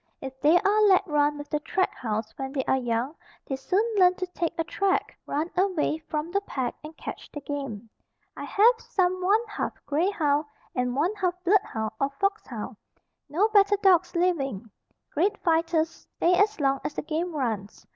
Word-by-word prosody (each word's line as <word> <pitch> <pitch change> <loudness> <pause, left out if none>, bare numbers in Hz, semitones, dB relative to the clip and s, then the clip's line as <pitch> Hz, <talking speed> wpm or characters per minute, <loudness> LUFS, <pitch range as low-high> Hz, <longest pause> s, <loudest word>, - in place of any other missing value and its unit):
If 265 -1 -8
they 305 +4 +6
are 420 +2 +3
let 385 0 +5
run 295 -3 +1
with 290 0 -9
the 300 - +1
track 375 +5 0
hounds 220 -2 -3
when 270 0 -5
they 270 -2 0
are - - +3
young 245 +2 -1 0.3
they 270 - -3
soon 365 +10 +1
learn 365 -1 +6
to 370 - -3
take 355 -2 -3
a 330 - +1
track, 385 +3 0
run 310 +4 -2
away 360 -5 +1
from 305 +2 -2
the 400 +2 +1
pack 260 -10 -3
and 310 +1 -10
catch - - -7
the 295 - -6
game. 275 -7 -5 0.5
I - - -6
have 460 +4 +4
some 370 -1 0
one 415 +5 +3
half 420 - -3
grey 320 +6 +1
hound 300 -6 +1 0.3
and 250 0 -1
one 330 +9 +1
half 365 -4 -1
bloodhound 305 - +1
or 275 - +1
fox 395 +2 0
hound. - - -6 0.5
No 355 +9 +3
better 410 -1 +5
dogs 365 -2 +4
living. 275 - 0 0.4
Great 395 +7 +1
fighters, 330 -1 +2 0.3
stay 350 - +3
as 410 +2 +3
long 275 -1 +2
as - - -4
the - - -3
game 325 +2 -2
runs. 220 -7 -3
325 Hz, 185 wpm, -26 LUFS, 275-375 Hz, 0.5 s, they